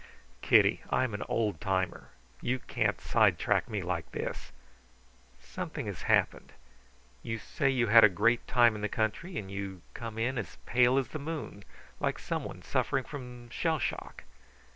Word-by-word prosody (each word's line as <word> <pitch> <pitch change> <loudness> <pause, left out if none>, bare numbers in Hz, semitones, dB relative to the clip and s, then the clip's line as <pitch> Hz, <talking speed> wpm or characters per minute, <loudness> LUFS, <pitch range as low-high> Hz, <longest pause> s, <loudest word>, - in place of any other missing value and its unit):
"Kitty, - - +5
I'm 130 -4 +1
an 105 - -4
old 105 -8 0
timer. 95 -1 -1 0.3
You 130 +2 0
can't - - -1
sidetrack - - +2
me 105 -4 -2
like 85 -2 -3
this. - - -5 0.9
Something 60 0 -6
has - - -5
happened. - - +1 0.7
You 115 - -3
say 135 +5 -1
you 125 -3 +2
had 115 +1 +8
a 110 - +9
great 115 +6 +2
time 120 -2 +5
in 105 - -6
the 105 - -1
country, 115 - -2
and 95 -3 -5
you 95 -2 -5
come 115 -2 -7
in 120 +3 0
as 95 -6 -7
pale 125 +1 +4
as 135 -4 0
the 155 - -5
moon, 145 -9 -6 0.4
like - - 0
someone - - -5
suffering 135 - 0
from 125 -4 -9
shell 160 +5 0
shock. 130 - -4
115 Hz, 160 wpm, -30 LUFS, 100-130 Hz, 0.9 s, a